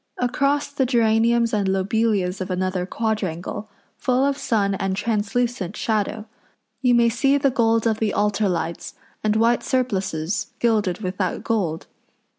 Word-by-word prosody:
Across 280 +4 0
the 285 -2 0
geraniums 230 -1 +3
and 205 -2 +1
lobelias 195 -1 0
of 185 - -4
another 185 0 -1
quadrangle, 210 -2 -3 0.3
full 255 +1 +2
of 280 0 +1
sun 210 -7 0
and 195 0 -1
translucent 215 -1 -1
shadow, 215 0 -1 0.6
you 250 -2 +4
may 235 0 +5
see 275 +5 +2
the 275 -1 +2
gold 230 -2 +2
of 220 -1 +1
the 220 -2 +1
altar 205 0 +1
lights, 170 -1 -3 0.3
and 215 0 +1
white 230 +2 +3
surplices 195 - -1
gilded 215 -5 +1
with 185 -1 -4
that 185 -3 -2
gold. 185 -9 -1
220 Hz, 145 wpm, -22 LUFS, 190-235 Hz, 0.6 s, may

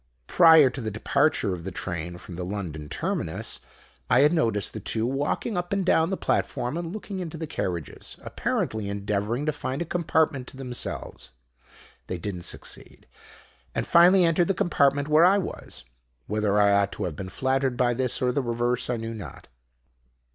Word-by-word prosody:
"Prior 160 - +7
to 130 - -6
the 110 - -2
departure 110 0 +1
of 85 -2 -6
the 95 - -4
train 85 -2 -5
from 90 - -11
the 90 +1 -4
London 90 -6 -5
terminus, - - -2 0.5
I 125 - +5
had 150 +3 +5
noticed 115 - +1
the 110 - -5
two 110 +2 -1
walking 140 - -1
up 175 0 -3
and 200 -2 0
down 165 -2 +3
the 190 - -1
platform 125 +4 -1
and 170 -1 -4
looking 200 -1 -6
into 165 -3 -5
the 160 - -4
carriages, 90 - -5
apparently 110 -2 -2
endeavouring 105 +6 -2
to 155 - +2
find 135 -2 -4
a 170 - -2
compartment 160 -6 0
to - - -11
themselves. 125 - -5 0.7
They 90 - -3
did 100 +4 -4
not 90 -1 -6
succeed, - - -7 0.7
and - - -1
finally 180 +2 +6
entered 165 +1 +3
the 195 - +1
compartment 145 -4 +2
where 155 +2 +5
I 190 +3 +6
was. 75 - -5 0.4
Whether 105 -1 +1
I 100 0 +5
ought 100 0 +3
to 105 - -4
have 90 -5 -3
been 95 +4 -6
flattered 130 +3 0
by 120 -1 +2
this, 130 +1 0
or 125 - +3
the 140 - 0
reverse, 120 0 -1
I 125 - 0
knew 115 0 -5
not. 95 -11 -9
125 Hz, 185 wpm, -26 LUFS, 100-160 Hz, 0.7 s, Prior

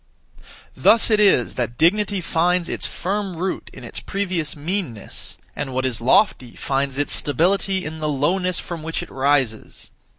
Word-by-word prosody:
Thus 230 0 +5
it 215 - +4
is 195 - +4
that 120 0 -3
dignity 200 +4 +2
finds 175 +1 +1
its - - -1
(firm) 195 -1 -3
root 185 +3 -3
in - - -12
its - - -5
(previous) 185 -6 -2
meanness, 150 - -4 0.2
and 135 -3 -4
what 130 0 0
is 120 -3 -1
lofty 125 - +2
finds 135 0 -1
its 145 - 0
stability 190 +6 +1
in 160 +1 -6
the 155 -1 -1
lowness 175 +6 +1
(from 170 -2 -5
which 165 +2 -3
it - - -12
rises). 135 -5 -1
165 Hz, 160 wpm, -21 LUFS, 135-190 Hz, 0.2 s, Thus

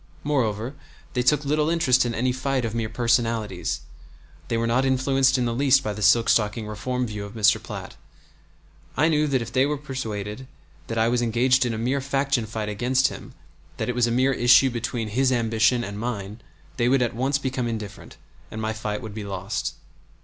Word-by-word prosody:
Moreover, 120 -4 -1 0.4
they 125 - +1
took 145 +3 +2
little 150 +2 +1
interest 130 -7 +3
in 115 - -3
any 125 +2 +1
fight 130 0 -1
of 110 - -3
mere 115 -1 -2
personalities. 115 -6 0 0.7
They 115 - -1
were 115 - 0
not 120 +3 +2
influenced 130 0 +2
in 125 - 0
the 120 - -1
least 135 +1 +3
by 105 - -2
the 105 - -7
silk 115 +4 +4
stocking 105 0 +1
reform 125 +4 -3
view 105 -3 -5
of 100 +2 -9
Mr. 105 -2 +3
Platt. - - -8 1.0
I 155 +4 +4
knew 150 -1 +2
that 130 -4 +1
if 115 0 -10
they 130 +1 +3
were 150 0 -1
persuaded 120 -4 -5 0.4
that 115 - -4
I 110 0 +3
was 120 +1 +1
engaged 125 +2 +2
in 115 - -2
a - - -4
mere 130 +5 0
faction 135 -3 0
fight 110 -1 -4
against 125 +5 +1
him, - - -10 0.4
that - - -2
it - - 0
was 120 -1 +2
a - - -1
mere 130 +3 +2
issue 125 +2 +5
between 115 -1 -3
his 130 +4 +2
ambition 115 0 +2
and 100 -2 -6
mine, 105 -2 -5 0.4
they 120 -1 +2
would 135 -1 +3
at 120 -1 -2
once 135 +3 +1
become 130 -3 -2
indifferent, 110 -3 -7 0.3
and 110 - -7
my 110 0 -2
fight 105 -1 -4
would 110 -2 -7
be 105 0 -6
lost. 100 +1 -4
120 Hz, 200 wpm, -24 LUFS, 110-130 Hz, 1.0 s, issue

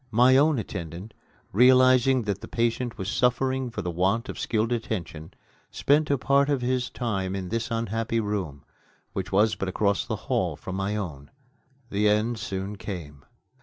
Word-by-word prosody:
My 125 +3 +5
own 145 +2 +4
attendant, 95 -1 -6 0.4
realizing 130 +2 +5
that 100 -2 -3
the - - -8
patient 120 +1 -1
was 95 - -4
suffering 130 +3 +1
for 120 - -5
the 90 - -2
want 95 +8 0
of - - -6
skilled 110 +1 0
attention, 85 -9 -4 0.3
spent 150 +2 +2
a 140 - +3
part 140 +2 +2
of 140 -4 0
his 125 0 0
time 95 -6 -2
in 95 -2 -4
this 115 +1 -2
unhappy 115 0 -1
room, 95 -10 -3 0.5
which 95 -1 -4
was 105 +3 +3
but 95 - -3
across 100 +1 +1
the - - -3
hall - - 0
from 95 - -7
my 100 +2 -1
own. 80 -9 -5 0.6
The 105 +1 +2
end 110 +2 +1
soon 100 -2 -4
came. 75 -9 -7
110 Hz, 165 wpm, -26 LUFS, 95-125 Hz, 0.6 s, My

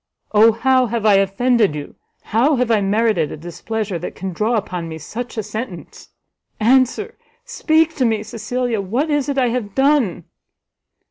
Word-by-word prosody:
Oh 220 +1 +6
how 255 +2 +2
have 230 -1 -3
I 210 - +6
offended 200 -1 +2
you? 145 -1 -7 0.3
how 255 +8 +2
have 250 -2 0
I 215 -2 +3
merited 205 -5 +1
a - - -6
displeasure 190 +4 -4
that 175 - -6
can 190 -1 -5
draw 215 +6 0
upon 180 -5 -3
me 160 - -6
such 230 - -7
a 220 - -1
sentence? 210 -3 -8 0.5
Answer, 260 - +2 0.3
speak 320 -6 +1
to 260 - +2
me, 220 -2 0
Cecilia, 235 0 -3
what 245 - -1
is 290 -1 0
it 280 - -2
I 250 -2 +2
have 230 -5 -4
done?" 270 - +2
225 Hz, 170 wpm, -19 LUFS, 200-255 Hz, 0.5 s, Oh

